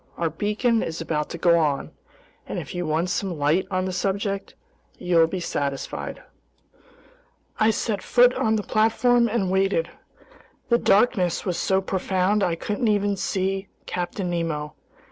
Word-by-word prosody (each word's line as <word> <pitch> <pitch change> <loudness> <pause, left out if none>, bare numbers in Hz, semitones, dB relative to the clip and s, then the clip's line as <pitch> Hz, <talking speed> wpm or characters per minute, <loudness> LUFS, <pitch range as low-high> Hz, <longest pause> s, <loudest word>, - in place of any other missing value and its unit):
Our 165 -2 -1
beacon 215 +6 +1
is 165 0 -4
about 155 -2 -2
to - - -6
go 170 0 +4
on, 145 -3 0 0.6
and - - -4
if - - -6
you 175 -2 -3
want 165 +4 0
some 185 -4 -2
light 155 +6 +1
on 185 -1 -1
the 185 - -3
subject, 195 +1 -2 0.4
you'll 170 -2 +3
be 185 +3 -4
satisfied." 140 -5 -4 1.4
I 220 - +4
set 215 -2 -1
foot 245 0 +4
on 220 -3 +1
the 210 - -1
platform 235 +3 +3
and 205 -5 0
waited. 190 -3 +1 0.8
The 235 0 +4
darkness 195 -4 +2
was 180 -3 -1
so 190 0 +2
profound 190 +2 0
I 175 -3 +1
couldn't 205 +1 0
see 190 0 0
even 195 0 -9 0.2
Captain 180 +1 -3
Nemo. 155 -3 -2
190 Hz, 150 wpm, -24 LUFS, 170-210 Hz, 1.4 s, go